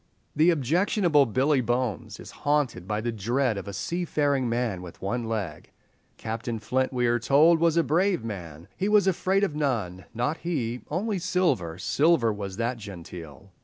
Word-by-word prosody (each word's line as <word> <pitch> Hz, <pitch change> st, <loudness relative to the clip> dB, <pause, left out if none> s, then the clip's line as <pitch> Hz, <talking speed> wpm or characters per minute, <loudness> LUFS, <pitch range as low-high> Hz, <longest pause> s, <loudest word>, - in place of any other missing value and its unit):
The 155 Hz, +4 st, +5 dB
objectionable 165 Hz, -, +3 dB
Billy 130 Hz, +4 st, +2 dB
Bones 120 Hz, -5 st, -2 dB
is -, -, -10 dB
haunted 145 Hz, -10 st, 0 dB
by 105 Hz, +1 st, -1 dB
the 120 Hz, +1 st, -1 dB
dread 120 Hz, +3 st, 0 dB
of 100 Hz, -, -6 dB
"a -, -, -4 dB
seafaring 145 Hz, -, 0 dB
man 115 Hz, -6 st, -1 dB
with 90 Hz, -2 st, -10 dB
one 115 Hz, +5 st, -2 dB
leg." 105 Hz, -9 st, -4 dB, 0.5 s
Captain 115 Hz, +1 st, -4 dB
Flint, 125 Hz, +5 st, -1 dB
we 125 Hz, -2 st, 0 dB
are 120 Hz, 0 st, +2 dB
told, 150 Hz, +8 st, +5 dB
was 165 Hz, 0 st, +3 dB
a 170 Hz, -, +5 dB
brave 175 Hz, -, +1 dB
man; 85 Hz, -7 st, -7 dB
"he 195 Hz, +2 st, -1 dB
was 210 Hz, -2 st, +5 dB
afraid 190 Hz, +1 st, +1 dB
of 165 Hz, -7 st, 0 dB
none, 110 Hz, -12 st, -2 dB
not 125 Hz, +7 st, -1 dB
he, 125 Hz, -9 st, -3 dB
only 195 Hz, +5 st, -1 dB
Silver—Silver 140 Hz, -, +1 dB
was 100 Hz, -2 st, -6 dB
that 120 Hz, +2 st, -1 dB
genteel." 90 Hz, -3 st, -10 dB
125 Hz, 165 wpm, -26 LUFS, 105-160 Hz, 0.5 s, The